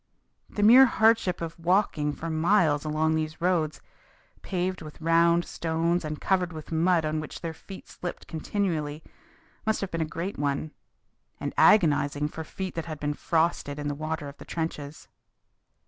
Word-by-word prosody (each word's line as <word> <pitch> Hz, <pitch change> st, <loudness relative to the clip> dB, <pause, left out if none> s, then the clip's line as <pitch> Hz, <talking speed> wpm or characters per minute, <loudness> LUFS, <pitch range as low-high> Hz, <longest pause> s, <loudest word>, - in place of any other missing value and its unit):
The 205 Hz, -, -2 dB
mere 250 Hz, +5 st, +9 dB
hardship 220 Hz, -6 st, +2 dB
of 165 Hz, 0 st, -5 dB
walking 170 Hz, -4 st, +1 dB
for 165 Hz, -, -6 dB
miles 160 Hz, -2 st, +2 dB
along 155 Hz, +1 st, +1 dB
those 155 Hz, 0 st, -2 dB
roads, 170 Hz, -3 st, 0 dB, 0.6 s
paved 185 Hz, -1 st, -2 dB
with 155 Hz, -2 st, -10 dB
round 170 Hz, +1 st, +3 dB
stones 165 Hz, +1 st, -1 dB
and 155 Hz, -1 st, -4 dB
covered 185 Hz, -2 st, +1 dB
with 155 Hz, -1 st, -9 dB
mud 165 Hz, 0 st, +2 dB
on 155 Hz, 0 st, -1 dB
which 155 Hz, -, -7 dB
their 165 Hz, -1 st, -4 dB
feet 190 Hz, +5 st, -11 dB
slipped 175 Hz, -, -7 dB
continually, 160 Hz, -3 st, -2 dB, 0.6 s
must 220 Hz, 0 st, 0 dB
have 195 Hz, -, -3 dB
been 165 Hz, -, -2 dB
a -, -, +1 dB
great 170 Hz, +5 st, -5 dB
one, 145 Hz, +1 st, -1 dB, 0.7 s
and -, -, -4 dB
agonizing 150 Hz, -6 st, +4 dB
for 160 Hz, -, -6 dB
feet 185 Hz, +4 st, -6 dB
that 165 Hz, -, -4 dB
had 155 Hz, -3 st, -6 dB
been 145 Hz, 0 st, -1 dB
frosted 160 Hz, -2 st, 0 dB
in 145 Hz, 0 st, -3 dB
the -, -, -1 dB
water 155 Hz, 0 st, -4 dB
of 140 Hz, 0 st, -10 dB
the -, -, -10 dB
trenches. 155 Hz, -3 st, -5 dB
160 Hz, 165 wpm, -27 LUFS, 155-180 Hz, 0.7 s, mere